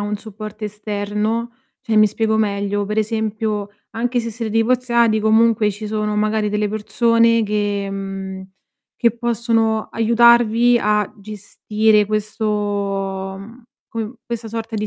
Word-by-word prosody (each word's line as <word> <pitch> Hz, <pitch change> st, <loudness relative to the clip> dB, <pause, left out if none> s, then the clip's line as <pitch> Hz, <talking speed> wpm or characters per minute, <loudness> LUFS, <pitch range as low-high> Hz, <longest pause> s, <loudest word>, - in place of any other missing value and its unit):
un 205 Hz, +1 st, -2 dB
supporto 215 Hz, 0 st, -8 dB
esterno? 210 Hz, +2 st, -3 dB, 0.3 s
Cioè, 220 Hz, -1 st, -1 dB
mi 215 Hz, 0 st, +7 dB
spiego 220 Hz, +1 st, 0 dB
meglio, 205 Hz, -1 st, 0 dB
per 210 Hz, +2 st, -2 dB
esempio 215 Hz, -1 st, -2 dB, 0.2 s
anche 245 Hz, +2 st, -1 dB
se 230 Hz, 0 st, -4 dB
siete 225 Hz, 0 st, -5 dB
divorziati 235 Hz, -1 st, +2 dB
comunque 220 Hz, 0 st, +3 dB
ci 210 Hz, +2 st, -7 dB
sono 210 Hz, 0 st, -2 dB
magari 215 Hz, 0 st, 0 dB
delle 210 Hz, 0 st, 0 dB
persone 230 Hz, +2 st, +2 dB
che 205 Hz, -1 st, -1 dB
mhmm, 195 Hz, -1 st, -6 dB, 0.5 s
che 235 Hz, -2 st, +2 dB
possono 230 Hz, -2 st, 0 dB
aiutarvi 235 Hz, +1 st, +4 dB
a 210 Hz, -2 st, +1 dB
gestire 210 Hz, +1 st, 0 dB
questo 215 Hz, +1 st, -3 dB, 0.9 s
mhmm, 230 Hz, +5 st, -12 dB, 0.3 s
come 225 Hz, +1 st, -5 dB
questa 235 Hz, -1 st, -4 dB
sorta 225 Hz, 0 st, -5 dB
di 215 Hz, 0 st, -2 dB
215 Hz, 130 wpm, -19 LUFS, 210-230 Hz, 0.9 s, mi